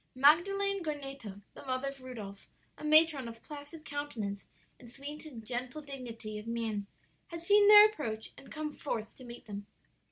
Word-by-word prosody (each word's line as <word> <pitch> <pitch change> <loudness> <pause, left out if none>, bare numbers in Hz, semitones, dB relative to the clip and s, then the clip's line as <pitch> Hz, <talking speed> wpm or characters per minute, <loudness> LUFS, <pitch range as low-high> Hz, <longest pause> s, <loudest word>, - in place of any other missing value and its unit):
"Magdalen 395 +8 +4
Goneto, 275 - -5
the - - -11
mother 260 +1 -1
of 275 -1 -11
Rudolph, 215 -6 -8 0.3
a - - -12
matron 305 -4 +5
of 230 0 -10
placid 300 +2 -9
countenance 230 -9 -4 0.3
and 240 - -12
sweet 290 +5 -7
and 230 -7 -10
gentle 250 +5 -3
dignity 235 -6 -6
of 210 - -10
mien 225 -3 -2 0.4
had 335 -1 -7
seen 410 +3 +6
their 420 0 +11
approach 235 - -2
and - - -14
come 305 -1 -4
forth 225 -6 -4
to 255 - -10
meet 240 -1 -10
them. 205 -1 -7
270 Hz, 165 wpm, -32 LUFS, 230-305 Hz, 0.4 s, their